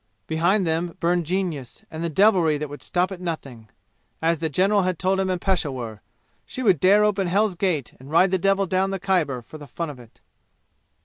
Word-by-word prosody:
Behind 175 +5 +1
them 165 +2 -2
burned 175 -2 +1
genius 170 -8 -3
and 160 +1 -5
the 170 - -1
devilry 175 -3 +3
that 150 0 -5
would 145 - -9
stop 180 +2 0
at 185 -2 -7
nothing. 135 -10 -6 0.5
As 165 0 +1
the 160 0 -1
general 195 +6 +2
had 185 -2 -1
told 190 +2 +1
him 190 -1 0
in 185 - 0
Peshawur, 130 - -2 0.4
she 255 - -6
would 190 - +4
dare 200 +6 +5
open 200 -3 +1
Hell's 200 +3 +2
gate 170 -7 -1
and 130 +2 -13
ride 180 +4 +4
the 190 - +1
devil 195 +1 +2
down 190 +1 0
the 195 0 -3
Khyber 170 -10 0
for 155 - -12
the 145 - -10
fun 165 +1 -4
of 135 - -13
it. 120 -2 -17
175 Hz, 205 wpm, -23 LUFS, 155-190 Hz, 0.5 s, dare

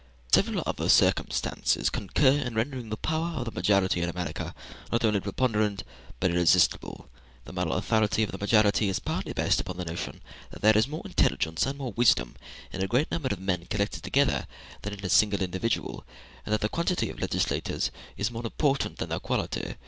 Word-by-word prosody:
Several - - +3
other - - -2
circumstances - - +2
concur 130 +7 +2
in 135 -5 -1
rendering 120 0 -2
the 110 - -3
power 160 +4 -2
of 120 - -2
the 115 - -4
majority 95 -5 +2
in 85 - 0
America 85 -3 -4 0.4
not 115 0 +2
only 105 -2 +3
preponderant, 105 0 0 0.4
but 95 -2 +2
irresistible. 85 0 +2 0.4
The - - -10
moral 90 -3 -1
authority 110 +3 +1
of 105 - -2
the - - -7
majority 105 0 +3
is 95 - 0
partly - - -3
based - - +1
upon 90 -1 -6
the 90 - -4
notion 85 +1 -6 0.3
that - - -12
there 110 0 +6
is 110 +2 +4
more 155 +3 -6
intelligence 80 +7 +1
and 135 +1 -3
more 135 -4 -4
wisdom 65 - +3 0.4
in 95 - -3
a - - 0
great 125 +9 +1
number 145 -6 -1
of 100 - -3
men 90 -3 -2
collected 100 +1 -2
together 140 -1 +1 0.3
than 105 - -5
in 100 -1 -7
a - - -2
single 100 -1 +4
individual, 95 +5 -2 0.4
and 105 - 0
that 110 - +1
the 105 - +2
quantity 170 +5 0
of - - -12
legislators - - -1 0.3
is 105 +3 -1
more 115 0 -6
important 135 +4 0
than - - -4
their - - -2
quality. - - -2
105 Hz, 190 wpm, -27 LUFS, 95-120 Hz, 0.4 s, there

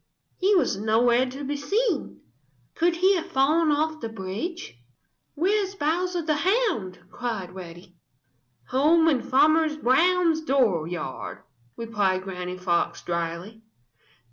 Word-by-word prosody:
He 395 +2 +3
was 275 - +2
nowhere 235 +4 +2
to 270 +3 -7
be 285 +1 -3
seen. 390 - -1 0.5
Could 340 +1 +1
he 375 +3 +3
have 330 - -4
fallen 305 +5 +2
off 310 +1 0
the 230 - -4
bridge? 215 - -6 0.6
"Where 365 +7 +1
is 390 0 -6
Bowser 350 +2 -1
the 305 -1 0
Hound?" 365 - 0
cried 220 -7 -4
Reddy. 175 -1 -11 0.7
"Home 315 +5 +4
in 275 -6 +2
Farmer 310 +4 +3
Brown's 325 +5 +3
dooryard," 180 - -1 0.3
replied 205 -5 -1
Granny 180 -1 -6
Fox 180 -2 -1
dryly. 170 +5 -4
270 Hz, 120 wpm, -25 LUFS, -, 0.7 s, Home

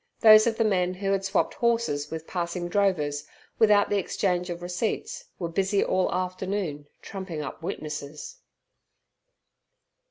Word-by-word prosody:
Those 215 0 +8
of 225 -1 0
the 225 - +3
men 185 -3 +1
who 195 +1 -2
had 195 0 +1
swapped 195 0 0
horses 230 -12 0
with 160 0 -6
passing 175 0 -3
drovers, 155 -7 0 0.3
without 210 -2 +5
the 205 - +3
exchange 180 -1 -1
of 175 0 -5
receipts, 180 +5 -3
were 170 - -3
busy 195 +4 +1
all 185 0 +1
afternoon 185 -4 -3 0.2
trumping 185 -6 -5
up 145 - -7
witnesses. 150 - -6
185 Hz, 135 wpm, -26 LUFS, 165-200 Hz, 0.3 s, Those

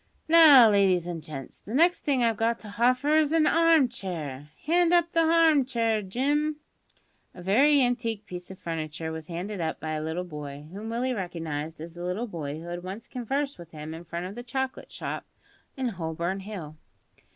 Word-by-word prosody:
"Now, 300 -8 +8
ladies 190 -4 +3
an' 170 -2 -4
gents, 145 -4 -8
the 220 - -7
next 340 +4 +4
thing 270 -4 +1
I've 230 -1 +2
got 230 +2 +1
to 215 - -10
hoffer 250 +8 +2
is 310 -2 +3
a 320 -1 +4
harm 330 -4 +5
chair. 150 - -6 0.2
Hand 345 +2 +3
up 345 -1 +3
the 330 -1 +3
harmchair, 270 -9 +3
Jim." 285 +10 0 0.8
A 180 - -10
very 270 +9 +5
antique 230 -4 -1
piece 180 -2 -8
of 190 - -9
furniture 160 -1 -4
was 160 -1 -7
handed 180 +3 -5
up 160 -1 -2
by 155 - -4
a 155 0 -2
little 160 +3 -3
boy, 150 -4 -8
whom 210 +3 -6
Willie 245 +3 -1
recognised 165 -6 -4
as 165 +1 -8
the 175 0 -8
little 180 +7 -2
boy 155 -8 -5
who 165 - -10
had 175 0 -5
once 195 +6 -7
conversed 270 +1 -3
with 170 -2 -11
him 155 0 -8
in 165 +1 -8
front 170 +1 -5
of 185 - -6
the 240 - -7
chocolate 260 +2 -4
shop - - -5 0.5
in 260 -2 -1
Holborn 170 0 -3
Hill. 185 -7 -8
205 Hz, 190 wpm, -27 LUFS, 165-260 Hz, 0.8 s, Now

